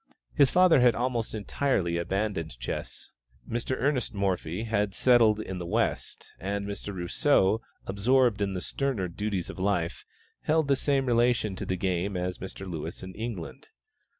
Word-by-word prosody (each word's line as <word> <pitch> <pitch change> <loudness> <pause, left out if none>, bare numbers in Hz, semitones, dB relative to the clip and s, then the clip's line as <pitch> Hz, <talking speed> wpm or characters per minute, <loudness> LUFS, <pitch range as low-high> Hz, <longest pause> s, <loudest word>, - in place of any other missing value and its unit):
His 140 -3 +5
father 180 -2 +5
had 120 -2 +5
almost 120 -2 -1
entirely 100 -6 0
abandoned 85 - -2
chess; - - -6 0.4
Mr. 120 +3 -1
Ernest 130 -5 0
Morphy 95 -1 -1
had 105 -3 0
settled 115 -4 +5
in 95 -4 -5
"the 90 - -5
West," - - -2
and 100 +1 -2
Mr. 100 0 -5
Rousseau, 95 +3 +2 0.2
absorbed 110 +2 +2
in 100 -1 0
the 90 - -3
sterner 130 -8 -1
duties 95 0 -3
of - - -11
life, 95 -4 0 0.4
held 155 -1 +2
the 140 - +5
same 135 0 +1
relation 120 -4 +2
to - - -6
the 95 - -1
game 95 +1 -1
as 90 0 -3
Mr. 95 +1 -7
Lewis 80 0 -6
in 95 0 -7
England. 110 -6 -6
100 Hz, 155 wpm, -28 LUFS, 95-120 Hz, 0.4 s, His